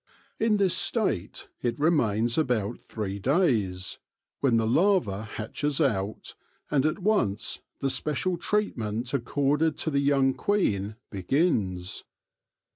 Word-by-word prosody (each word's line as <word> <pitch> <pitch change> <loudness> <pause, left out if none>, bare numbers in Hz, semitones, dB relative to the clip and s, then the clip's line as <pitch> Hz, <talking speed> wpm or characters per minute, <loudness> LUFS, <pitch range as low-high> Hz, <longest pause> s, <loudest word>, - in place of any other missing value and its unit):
In 220 -1 +3
this 195 -3 +3
state - - 0
it 120 -1 -1
remains 120 -8 +2
about 120 -7 0
three 100 -3 -5
days, 110 - +1 0.4
when 125 -5 +3
the 115 - +2
larva 120 - +2
hatches 125 +7 -3
out, 105 -8 -1 0.4
and 145 0 +3
at 155 - -1
once 185 - 0 0.2
the 135 - +1
special 155 +7 -1
treatment 125 - -2
accorded 145 +4 +1
to 160 - -2
the 140 - +2
young 140 -1 +3
queen 110 - 0 0.2
begins. 95 - 0
130 Hz, 120 wpm, -27 LUFS, 105-160 Hz, 0.4 s, In